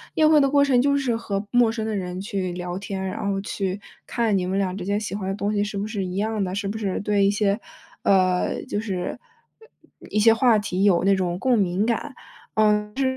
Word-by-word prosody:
宴 310 -1 +5
会 305 -2 +6
的 275 - +3
过 285 0 +4
程 255 -3 +3
就 280 +1 +2
是 260 -4 0
和 205 -3 -3
陌 245 -2 +4
生 225 -1 -3
的 220 - -2
人 180 -2 -4
去 195 -2 -3
聊 180 0 -5
天， 195 0 -5
然 190 - -4
后 195 -1 0
去 195 0 -3 0.3
看 225 -4 0
你 180 - -1
们 190 +2 -1
俩 190 -2 -1
之 185 - -5
间 205 +1 0
喜 200 -2 -4
欢 205 - -4
的 - - -1
东 205 +1 -2
西 205 0 +1
是 205 -1 -4
不 205 - -2
是 205 -3 -3
一 180 0 -5
样 215 0 -1
的， 185 0 -3
是 200 0 -2
不 215 +2 -3
是 200 -4 -2
对 205 -1 +2
一 200 - +4
些， 205 -1 +1 0.4
呃， 185 -2 +2
就 205 - -2
是 185 -5 -3 0.9
一 210 - 0
些 225 +2 +6
话 225 -1 +4
题 195 -2 -2
有 190 -2 +4
那 195 0 +4
种 180 -1 -2
共 255 -2 +2
鸣 190 0 +1
感。 240 +4 -2 1.0
嗯， 260 - -3
200 Hz, 250 characters per minute, -23 LUFS, 190-225 Hz, 1.0 s, 会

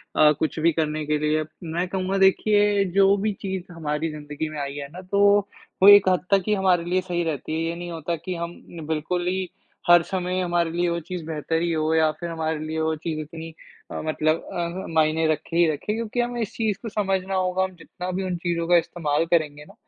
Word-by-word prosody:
अ, 150 -1 +6
कुछ 160 - -1
भी 165 +2 +4
करने 155 -1 -1
के 150 0 +1
लिए। 155 +1 +1 0.2
मैं 170 +2 -2
कहूँगा 190 +1 -1
देखिए 205 +1 +4
जो 195 0 +6
भी 210 +1 -1
चीज़ 190 -2 -4
हमारी 155 -1 -2
ज़िंदगी 150 +1 -5
में 155 - -6
आई 140 0 -4
है 140 -1 -5
ना, 180 +3 -9
तो 200 +2 +4 0.4
वो 195 - +9
एक 205 -2 +8
हद 185 -1 +1
तक 195 -2 +4
ही 215 - +3
हमारे 190 -4 +2
लिए 180 +2 +1
सही 175 -1 -2
रहती 155 -1 -3
है। 160 - -1
ये 170 - -3
नहीं 175 0 -6
होता 165 +1 -3
कि 180 +3 -5
हम 170 0 -5 0.3
बिल्कुल 165 +3 -1
ही 185 -1 -1 0.4
हर 175 -1 +8
समय 185 -1 -2
हमारे 175 -2 0
लिए 175 +1 0
वो 170 0 -1
चीज़ 175 +1 -6
बेहतर 160 +1 -2
ही 170 - 0
हो 155 0 0
या 160 -1 +4
फ़िर 170 +2 -7
हमारे 160 -1 -2
लिए 160 +1 -3
वो 160 0 0
चीज़ 155 0 -4
इतनी 160 +1 -8 0.4
अ, - - -4
मतलब 155 +1 0
अ, 175 +2 -3
मायने 160 0 +2
रखे 155 +2 -7
ही 170 - +6
रखे 155 +8 -3
क्योंकि 230 +1 -3
हमें 240 0 -2
इस 215 - -3
चीज़ 215 -4 0
को 230 - -5
समझना 195 -2 -1
होगा। 185 0 +1
हम 190 -1 -4
जितना 180 +2 -7
भी 190 +1 -2
उन 185 -1 -2
चीज़ों 170 -1 0
का 175 - +6
इस्तेमाल 160 -2 0
करेंगे 155 -3 0
ना, - - -16
170 Hz, 225 wpm, -24 LUFS, 160-185 Hz, 0.4 s, वो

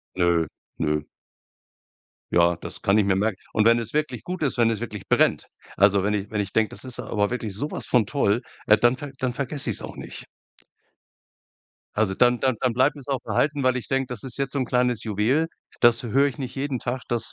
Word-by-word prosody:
Ne, 85 -3 +2 0.3
ne. 75 -1 -1 1.2
Ja, 85 0 +3
das - - -7
kann 100 +2 +3
ich 105 - +3
mir 95 -1 +2
merken. 100 0 0 0.2
Und 110 - +2
wenn 115 +1 +5
es 115 -1 -6
wirklich 150 0 -1
gut 180 -2 -4
ist, 135 - 0
wenn 115 -1 +4
es 110 -1 -2
wirklich 105 -5 -6
brennt. - - +2 0.3
Also, 100 0 +4
wenn 105 +1 +1
ich 100 -1 -2
wenn 105 -1 -1
ich 100 -1 -3
denke, 110 -1 +2
das - - -3
ist 130 -2 -1
aber 105 -1 -1
wirklich 115 -4 -4
so 145 +9 -3
was - - -5
von 120 -4 +3
toll, 115 -2 +1 0.2
äh, 105 - +6
dann 120 +4 +3
ver 145 0 -7
dann 130 -2 -1
vergesse 140 +2 -1
ich's - - +1
auch - - -8
nicht. - - -7 1.7
Also 105 -2 +1
dann 120 +4 +3
dann 130 -2 +1
dann 125 -3 +1
bleibt 130 +4 +2
es 140 - -10
auch 135 -2 -1
behalten, 145 -1 0
weil 130 -1 +3
ich 125 - -3
denke, 135 -2 0
das 125 -4 -3
ist 130 -1 +1
jetzt 135 -1 -2
so 140 - 0
'n 130 - 0
kleines 125 -1 +1
Juwel. 115 +9 +1 0.3
Das 120 0 +5
hö 115 - -5
höre 140 +2 +4
ich 135 - -5
nicht 130 -3 -5
jeden 135 -2 -2
Tag. 125 +2 -3
Das 120 -2 +2
120 Hz, 230 wpm, -24 LUFS, 105-130 Hz, 1.7 s, äh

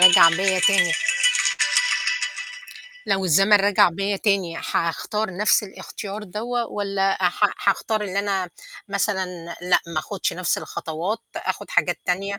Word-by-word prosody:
رَجَع 175 -2 +9
بيّا 190 +3 +1
تاني 195 -4 +4 2.1
لو 190 -1 0
الزمن 195 +5 +3
رَجَع 200 -1 +4
بيّا 195 +4 -2
تاني 190 -5 0
حاختار 190 +5 -2
نَفْس 210 +2 +3
الاختيار 205 +1 -8
دوَّة 230 +5 -3
والَّا 195 -2 -1
ح 205 - -1
حاختار 210 +2 -1
إن 190 -1 -6
أنا 195 -3 -1 0.4
مثلًا 200 -1 -1 0.4
لأ، 180 -1 +3
ما 165 -2 -4
آخُدش 195 +4 -3
نَفْس 180 -1 -1
الخطوات 170 +8 -4 0.2
آخُد - - -4
حاجات - - +1
تانية، 195 +2 -2
195 Hz, 125 wpm, -22 LUFS, 180-205 Hz, 2.1 s, رَجَع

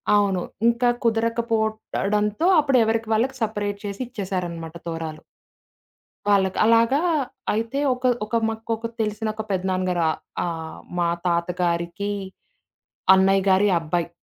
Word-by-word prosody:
అవును. 200 -3 +2 0.3
ఇంక 235 +1 +1 0.2
కుదరకపోవడంతో 220 0 0
అప్పుడెవరికి 230 -6 +2
వాళ్ళకి 250 +5 +1
సెపరేట్ 205 -2 -2
చేసి 200 +3 -5
ఇచ్చేసారనమాట 180 -7 -4
తోరాలు. 160 -2 -5 1.1
వాళ్ళకి. 195 -2 +3
అలాగా 230 +5 +4 0.5
అయితే 230 +5 -1
ఒక 250 0 -1 0.2
ఒక 215 - -3
మాకొక 225 +1 -3
తెలిసిన 215 0 -2
ఒక 220 - -4
పెద్దనాన్న 185 0 0
గారు 175 -1 0
ఆహ్, - - -6 0.3
ఆహ్, 165 -2 -5 0.2
మా 175 - +2 0.2
తాతగారికి, 170 +2 -1 1.0
అన్నయ్య 195 0 +3
గారి 190 +2 +4
అబ్బాయి. 170 +1 -2
205 Hz, 110 wpm, -23 LUFS, 180-225 Hz, 1.1 s, అలాగా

